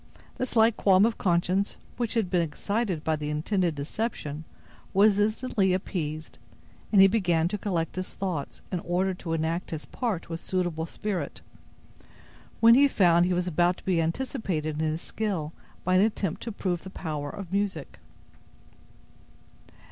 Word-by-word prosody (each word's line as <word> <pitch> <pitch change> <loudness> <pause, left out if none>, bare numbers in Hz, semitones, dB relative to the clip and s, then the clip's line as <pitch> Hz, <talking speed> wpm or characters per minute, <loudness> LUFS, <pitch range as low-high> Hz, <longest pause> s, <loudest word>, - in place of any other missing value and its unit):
The 255 - -1
slight 225 -2 +3
qualm 195 0 +5
of 230 0 -1
conscience 185 +2 +1 0.2
which 235 -1 -2
had 210 -6 0
been 180 -2 +3
excited 185 +2 -2
by 160 - +1
the 150 -1 -4
intended 170 +2 0
deception 150 -1 -4 0.5
was 205 +1 +5
instantly 215 -2 +1
appeased, 160 -4 -4 0.5
and 205 - +5
he 195 - +10
began 175 -6 +2
to 210 - -2
collect 170 -6 -2
his 185 - -4
thoughts, 180 -7 -4
in 180 - -1
order 180 +3 0
to 175 -2 -5
enact 165 +2 -1
his 155 -2 -5
part 225 -9 -3
with 165 0 -5
suitable 175 -4 -2
spirit, 205 +1 -4 1.2
when 230 0 +8
he 280 +4 +7
found 175 -8 +4
he 180 - +1
was 180 0 0
about 175 +1 +2
to - - -17
be 180 -3 +2
anticipated 160 - -2
in 160 - +1
his 160 +2 -3
skill 185 -8 -3 0.3
by 185 - +1
an 185 - +6
attempt 205 -5 0
to 230 - -4
prove 180 -4 -2
the 190 - -9
power 150 -5 -4
of 190 +1 -8
music. 195 -7 -2
180 Hz, 160 wpm, -27 LUFS, 165-205 Hz, 1.2 s, he